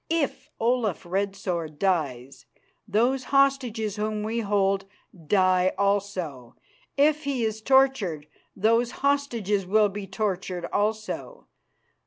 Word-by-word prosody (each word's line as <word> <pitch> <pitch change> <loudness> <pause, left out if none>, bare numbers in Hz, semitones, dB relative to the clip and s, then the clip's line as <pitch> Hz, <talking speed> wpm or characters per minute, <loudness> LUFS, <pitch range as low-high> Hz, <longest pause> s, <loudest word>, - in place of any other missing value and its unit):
If 300 -3 -1
Olaf 230 -6 0
Red 195 +3 -1
Sword 170 -6 -4
dies, 140 -9 -2 0.4
those 245 +6 +1
hostages 255 -7 +1
whom 210 0 -2
we 225 +2 -2
hold 195 -2 +1 0.4
die 185 -1 +3
also. 190 -11 -1 0.4
If 300 +1 +3
he 270 -4 -1
is 220 0 -3
tortured, 260 - +2 0.3
those 230 +4 +2 0.2
hostages 230 -9 0
will 210 +2 +4
be 200 0 -6
tortured 190 -3 -3
also. 215 - -2
210 Hz, 110 wpm, -26 LUFS, 185-245 Hz, 0.4 s, will